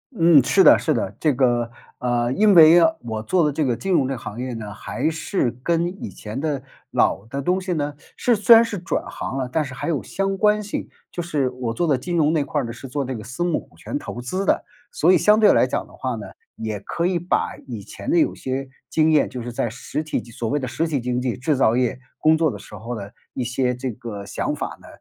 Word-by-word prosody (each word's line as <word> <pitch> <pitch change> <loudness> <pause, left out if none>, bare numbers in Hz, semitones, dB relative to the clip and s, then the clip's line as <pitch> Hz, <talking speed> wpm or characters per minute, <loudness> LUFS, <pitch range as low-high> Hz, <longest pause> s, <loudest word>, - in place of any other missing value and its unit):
嗯， 165 -5 +6
是 140 +9 +4
的， 155 - +8
是 155 - +1
的， - - -2
这 155 -3 +2
个， 120 -2 +2 0.3
呃， 120 -1 0
因 205 +6 +4
为 165 +1 +9 0.2
我 110 -2 -4
做 170 +6 +2
的 150 - +2
这 150 +1 0
个 120 - +1
金 190 +10 -3
融 150 -7 +3
这 135 - -2
个 130 - -4
行 105 0 -7
业 125 -1 -3
呢， 105 -3 -6
还 140 +9 -2
是 155 - -1
跟 170 +4 +1 0.2
以 - - -4
前 105 +5 -7
的 145 -3 -2 0.3
老 100 - +1
的 135 +5 -4
东 180 +6 +1
西 185 -1 -3
呢 145 -2 -2 0.2
是 245 - +2
虽 215 +3 +7
然 230 - +7
是 210 -5 -4
转 170 - -2
行 135 - -5
了， 130 -2 -2
但 160 -2 +1
是 130 - -8
还 135 - -4
有 150 -5 0
相 195 0 -2
关 210 +1 +3
性。 205 - -4 0.2
就 175 - -4
是 145 -6 0
我 125 -2 -4
做 175 - 0
的 140 -4 +3
金 175 +7 -4
融 155 -2 +3
那 160 -2 +2
块 145 +1 -1
儿 - - -4
呢， 115 - -4
是 120 +3 -9
做 140 +2 -2
这 130 0 -4
个 110 - -7
私 125 +10 -4
募 175 -3 +1
股 - - -18
权 90 - -5
投 120 - -7
资 185 +11 -3
的。 - - +2 0.3
所 - - +4
以 185 - +6
相 210 +7 +5
对 210 - +7
来 130 - +4
讲 - - -2
的 - - -19
话 130 -2 -3
呢， 110 - -7 0.3
也 110 -2 -4
可 170 +11 -3
以 180 -1 +1
把 175 - -1
以 115 -5 -6
前 275 - -8
的 335 - +3
有 315 - +3
些 130 +1 -4 0.2
经 160 +2 +3
验， 150 -2 +3
就 125 - -6
是 120 +1 -5
在 115 -1 -1
实 140 +6 -4
体 155 - -2
经 120 - -14
所 115 0 -4
谓 145 - +1
的 135 - -2
实 155 +7 -1
体 145 -6 -1
经 125 0 -1
济， 125 -1 -1
制 130 +2 0
造 115 -3 +3
业 125 0 0 0.2
工 155 +1 +4
作 160 -1 +2
的 105 - -5
时 100 - -14
候 115 +1 -6
呢， 100 -1 -7 0.2
一 130 - -2
些 125 +1 0
这 125 0 -3
个 105 -2 -7
想 - - -2
法 - - -5
呢， - - -15
135 Hz, 285 characters per minute, -22 LUFS, 120-165 Hz, 0.3 s, 为